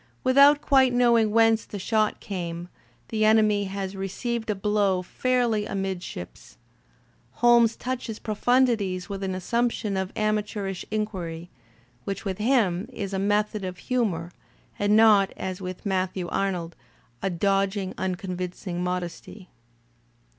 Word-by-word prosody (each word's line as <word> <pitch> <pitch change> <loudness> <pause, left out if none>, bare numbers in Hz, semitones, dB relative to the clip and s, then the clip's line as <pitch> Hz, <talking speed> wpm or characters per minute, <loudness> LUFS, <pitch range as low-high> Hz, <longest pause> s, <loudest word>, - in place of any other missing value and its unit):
With 255 0 +2
out 285 +1 +7
quite 265 -4 +4
knowing 235 -3 +4
whence 225 0 +4
the 205 - -8
shot 215 +2 0
came, 175 -3 -5 0.4
the 215 -1 0
enemy 215 -2 +4
has 195 0 -4
received 220 +4 -3
a 210 - +1
blow 200 -2 +1
fairly 240 0 0
amidships. 190 - -6 0.8
Holmes 235 -1 +4
touches 250 -3 -4
pro 215 - -4
fundities 215 -6 +1
with 200 -1 -5
an 190 -1 -2
assumption 230 +1 -1
of 190 0 -2
amateurish 210 -3 -2
inquiry, 180 -6 -4 0.5
which 200 +2 -5
with 190 -1 -3
him 215 -4 +1
is 200 -5 -5
a 190 - -1
method 210 +1 0
of 185 -1 -5
humour, 185 -8 -1 0.5
and 205 +1 +3
not, 215 -3 +6
as 185 0 -5
with 185 +1 -7
Matthew 185 -2 -1
Arnold, 175 -4 -2 0.5
a 195 - 0
dodging, 195 +1 0
unconvincing 180 -1 -4
modesty. 180 +2 -5
200 Hz, 130 wpm, -25 LUFS, 185-225 Hz, 0.8 s, out